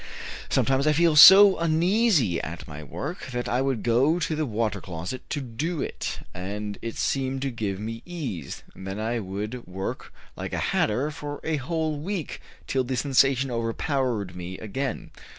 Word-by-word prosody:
Sometimes 135 Hz, +2 st, +2 dB
I 155 Hz, -, +5 dB
felt 160 Hz, -1 st, +4 dB
so 195 Hz, +2 st, +10 dB
uneasy 170 Hz, -, +2 dB
at 85 Hz, +1 st, -7 dB
my 75 Hz, 0 st, -8 dB
work 150 Hz, -, -6 dB
that 125 Hz, -1 st, -3 dB
I 125 Hz, -, +1 dB
would 135 Hz, -4 st, -1 dB
go 130 Hz, +8 st, +3 dB
to 160 Hz, -2 st, -1 dB
the 155 Hz, -1 st, -1 dB
water 110 Hz, -3 st, -1 dB
closet 90 Hz, +8 st, -6 dB
to 145 Hz, -, -2 dB
do 145 Hz, +7 st, -3 dB
it, -, -, -4 dB
and 100 Hz, +3 st, -5 dB
it 115 Hz, -1 st, -5 dB
seemed 135 Hz, 0 st, -1 dB
to 135 Hz, -, -1 dB
give 105 Hz, -5 st, -3 dB
me 115 Hz, +2 st, -5 dB
ease, 150 Hz, -, -6 dB
and 95 Hz, -, -10 dB
then 95 Hz, +2 st, -4 dB
I 115 Hz, +2 st, -1 dB
would 105 Hz, +4 st, -5 dB
work 95 Hz, +1 st, -5 dB, 0.2 s
like -, -, -6 dB
a -, -, -1 dB, 0.2 s
hatter 125 Hz, +8 st, +1 dB
for 145 Hz, -1 st, -6 dB
a 160 Hz, -1 st, 0 dB
whole 155 Hz, +2 st, -2 dB
week, 180 Hz, 0 st, -4 dB, 0.2 s
till 130 Hz, -1 st, 0 dB
the 130 Hz, 0 st, -3 dB
sensation 135 Hz, 0 st, +3 dB
overpowered 115 Hz, -, -1 dB
me 90 Hz, +1 st, -6 dB
again. 130 Hz, +4 st, -4 dB
130 Hz, 170 wpm, -26 LUFS, 105-150 Hz, 0.2 s, so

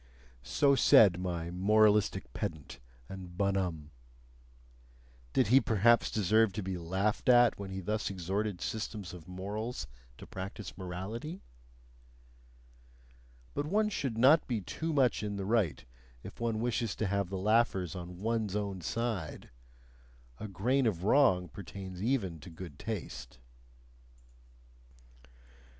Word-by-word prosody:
So 140 Hz, -, +2 dB
said 110 Hz, -10 st, +6 dB
my 85 Hz, -2 st, -3 dB
moralistic 105 Hz, -, +3 dB
pedant 80 Hz, -3 st, -5 dB, 0.3 s
and 90 Hz, -2 st, -9 dB
bonhomme. 95 Hz, -6 st, -1 dB, 1.4 s
Did 120 Hz, -, +2 dB
he 135 Hz, +3 st, +7 dB
perhaps 115 Hz, +2 st, +3 dB
deserve 110 Hz, 0 st, +3 dB
to 105 Hz, 0 st, -4 dB
be 95 Hz, 0 st, -3 dB
laughed 95 Hz, +8 st, -1 dB
at 120 Hz, -3 st, +6 dB
when 100 Hz, -1 st, -6 dB
he 95 Hz, 0 st, -5 dB
thus 105 Hz, +3 st, -2 dB
exhorted 95 Hz, +1 st, -3 dB
systems 105 Hz, -4 st, -4 dB
of 85 Hz, -3 st, -11 dB
morals 105 Hz, +6 st, -4 dB, 0.3 s
to -, -, -10 dB
practise 95 Hz, +2 st, -7 dB
morality? 100 Hz, -, -6 dB, 2.1 s
But 145 Hz, +1 st, -2 dB
one 210 Hz, +5 st, +2 dB
should 135 Hz, -, -3 dB
not 140 Hz, +7 st, +5 dB
be 115 Hz, -5 st, -1 dB
too 160 Hz, -, -4 dB
much 135 Hz, -5 st, +2 dB
in 105 Hz, -1 st, -3 dB
the 100 Hz, -1 st, -4 dB
right 100 Hz, -, 0 dB, 0.4 s
if -, -, -10 dB
one 115 Hz, -2 st, -1 dB
wishes 115 Hz, -2 st, -1 dB
to 110 Hz, -, -2 dB
have 100 Hz, -1 st, -1 dB
the 95 Hz, -, -3 dB
laughers 95 Hz, -4 st, +1 dB
on 90 Hz, 0 st, -7 dB
ONE'S 110 Hz, -2 st, -1 dB
OWN 100 Hz, -3 st, -3 dB
side; 110 Hz, -3 st, -3 dB, 0.9 s
a 110 Hz, -, -5 dB
grain 120 Hz, +7 st, +1 dB
of 90 Hz, -5 st, -1 dB
wrong 100 Hz, -6 st, +4 dB
pertains 95 Hz, +1 st, -8 dB
even 105 Hz, -8 st, -1 dB
to 90 Hz, -, -11 dB
good 80 Hz, -3 st, -10 dB
taste. -, -, -6 dB
100 Hz, 130 wpm, -31 LUFS, 90-115 Hz, 2.1 s, he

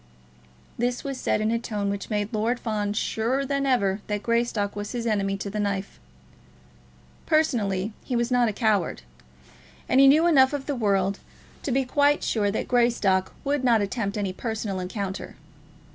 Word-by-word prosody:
This 245 Hz, +1 st, -1 dB
was 275 Hz, -2 st, -4 dB
said -, -, 0 dB
in 215 Hz, +1 st, +1 dB
a 230 Hz, -, +1 dB
tone 205 Hz, -3 st, -2 dB
which 200 Hz, 0 st, -5 dB
made 210 Hz, 0 st, -2 dB
Lord 225 Hz, +3 st, 0 dB
Fawn 210 Hz, -3 st, -2 dB
surer 235 Hz, +5 st, -1 dB
than 275 Hz, 0 st, -1 dB
ever 200 Hz, -6 st, +1 dB
that 210 Hz, -1 st, -2 dB
Greystock 230 Hz, -3 st, 0 dB
was 205 Hz, +2 st, -5 dB
his 240 Hz, -1 st, -3 dB
enemy 200 Hz, -3 st, 0 dB
to 195 Hz, -, -5 dB
the 210 Hz, +1 st, -4 dB
knife. 200 Hz, -1 st, -3 dB, 1.3 s
Personally, 220 Hz, -, +1 dB
he 255 Hz, -, -3 dB
was 235 Hz, +1 st, 0 dB
not 245 Hz, -2 st, +3 dB
a -, -, -1 dB
coward; 205 Hz, -, 0 dB, 0.8 s
and 260 Hz, -, +3 dB
he 275 Hz, -, +8 dB
knew 305 Hz, +5 st, +6 dB
enough 275 Hz, -5 st, +5 dB
of 280 Hz, -2 st, -3 dB
the 290 Hz, -, -2 dB
world 200 Hz, -5 st, +1 dB, 0.4 s
to 280 Hz, -, -3 dB
be 265 Hz, +1 st, +1 dB
quite 285 Hz, +3 st, +2 dB
sure 205 Hz, -3 st, +1 dB
that 200 Hz, -, -2 dB
Greystock 230 Hz, -6 st, +2 dB
would 285 Hz, -1 st, 0 dB
not 235 Hz, -3 st, +4 dB
attempt 200 Hz, 0 st, -2 dB
any 200 Hz, -3 st, -2 dB
personal 215 Hz, -2 st, -3 dB
encounter. 190 Hz, +1 st, -5 dB
220 Hz, 175 wpm, -25 LUFS, 200-250 Hz, 1.3 s, he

